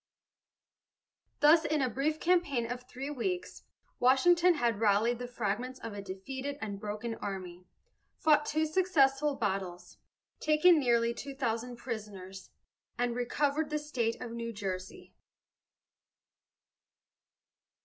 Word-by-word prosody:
"Thus 315 +2 +7
in 305 0 0
a - - +2
brief 280 +6 -1
campaign 340 -9 +2
of 245 0 -4
three 270 +3 -5
weeks, 360 +7 -4 0.3
Washington 340 +8 +5
had 235 -7 0
rallied 225 +3 +2
the 245 - -4
fragments 245 +2 -3
of 225 - -7
a 205 - -6
defeated 260 +9 -6
and 200 -4 -5
broken 215 +3 -4
army, 185 -3 -6 0.5
fought 300 -1 +3
two 315 +1 +1
successful 300 -5 +2
battles, 190 -6 -3 0.4
taken 310 +2 +5
nearly 235 -3 +2
two 275 +3 -7
thousand 245 -2 -2
prisoners, 205 -6 -7 0.5
and 240 0 0
recovered 285 +5 0
the 300 - 0
state 255 -7 -2
of 245 - -6
New 230 0 -4
Jersey." 190 -3 -6
245 Hz, 120 wpm, -31 LUFS, 215-295 Hz, 0.5 s, Thus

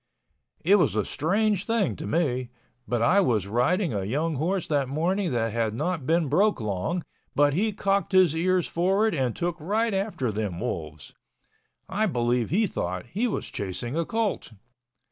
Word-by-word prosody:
It 200 +4 +6
was 175 - +2
a 105 -3 +1
strange 200 +4 0
thing 225 -5 +1
to - - -6
me—but 125 -5 -2
I 185 +12 +5
was 115 - +2
riding 125 - +1
a 100 -2 -1
young 150 +11 -1
horse 180 +5 0
that 140 -4 0
morning 175 +6 0
that 115 -3 0
had 115 -2 0
not 165 0 -2
been 165 -1 +2
broke 200 +8 +2
long, 110 - -2 0.3
but 145 0 +4
he 210 +7 +1
cocked 200 0 0
his 185 -5 +5
ears 180 +1 +2
forward 195 +5 +1
and 130 -7 0
took 175 0 -2
right 215 +7 0
after 195 - -1
them 100 -4 -3
wolves. 75 -4 -5 0.7
I 215 +3 0
believe 120 - 0
he 215 +6 +2
thought 90 - -3
he 225 +6 +1
was 225 - -4
chasing 105 +7 -4
a 170 - +1
colt. 220 - -2
160 Hz, 165 wpm, -26 LUFS, 120-195 Hz, 0.7 s, It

